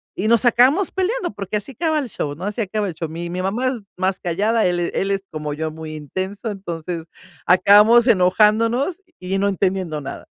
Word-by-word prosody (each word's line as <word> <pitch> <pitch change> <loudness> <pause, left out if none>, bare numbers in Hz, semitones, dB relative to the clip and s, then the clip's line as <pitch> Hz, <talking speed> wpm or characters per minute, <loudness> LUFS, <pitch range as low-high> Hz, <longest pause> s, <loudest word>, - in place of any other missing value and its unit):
y 205 - -2
nos 235 +2 +4
acabamos 260 +10 +4
peleando 380 - -1
porque 200 +1 -5
así 210 +6 -7
acaba 315 +4 0
el 265 - -4
show, 145 -8 -4
¿no? 175 - -10
Así 210 +3 -4
acaba 210 0 -2
el 175 - -6
show. 165 +1 -5
Mi 170 +2 -6
mi 180 - -3
mamá 215 +8 -1
es 245 -4 -5 0.2
más 185 +1 -1
callada. 210 +6 0
Él 175 -1 +1
él 195 +1 -1
es 195 0 -1
como 150 -1 -4
yo, 160 0 -3
muy 155 0 -8
intenso. 190 - -5
Entonces 170 -4 -6 0.4
acabamos 210 +6 +6
enojándonos 225 - +3 0.2
y 185 +1 -2
no 200 - +1
entendiendo 185 -5 -1
nada. 140 - -8
195 Hz, 195 wpm, -20 LUFS, 175-230 Hz, 0.4 s, acabamos